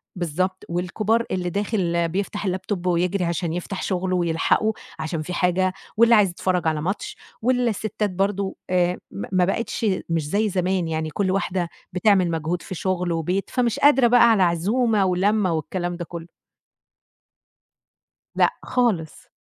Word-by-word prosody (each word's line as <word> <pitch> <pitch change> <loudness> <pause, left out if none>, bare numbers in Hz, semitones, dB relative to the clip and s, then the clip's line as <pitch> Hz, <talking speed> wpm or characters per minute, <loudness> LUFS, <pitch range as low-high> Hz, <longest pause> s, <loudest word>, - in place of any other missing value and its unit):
بالضبط، 185 +2 -2
والكبار 210 +7 0
اللي 180 -1 -1
داخل 175 -4 0
بيفتح 200 +3 -3
الlaptop 185 0 -2
ويجري 180 +2 +1
عشان 170 -1 -2
يفتح 180 +2 -4
شُغله 185 -1 -1
ويلحقه 175 +5 +1 0.3
عشان 155 0 -3
فيه 180 +4 -5
حاجة، 185 +1 +1 0.2
واللي 235 +1 +6
عايز 205 -3 +5
يتفرج 180 0 -1
على 155 -1 0
ماتش. 220 - -3 0.2
والستات 220 -4 0
برضو 195 +1 -1
آآ 180 0 +2
م 200 - -6
ما 185 -1 +3
بقِتش 230 +4 -2 0.2
مش 165 -3 -1
زي 210 +4 +1
زمان 185 -2 0
يعني 160 -1 -2
كُل 190 +4 -1
واحدة 185 -2 -1 0.2
بتعمل 185 -2 +3
مجهود 165 +2 -2
في 185 - -7
شُغل 180 0 -1
وبيت 175 +4 -1
فمش 250 0 0
قادرة 280 -4 +5
بقى 235 -1 +6
على 195 -4 +4
عزومة 205 +5 +2
ولمّة 190 +1 +2
والكلام 175 +3 -3
ده 175 - -5
كلّه. 170 0 -8 2.1
لأ - - +3
خالص. 215 -11 -1
185 Hz, 145 wpm, -23 LUFS, 175-205 Hz, 2.1 s, واللي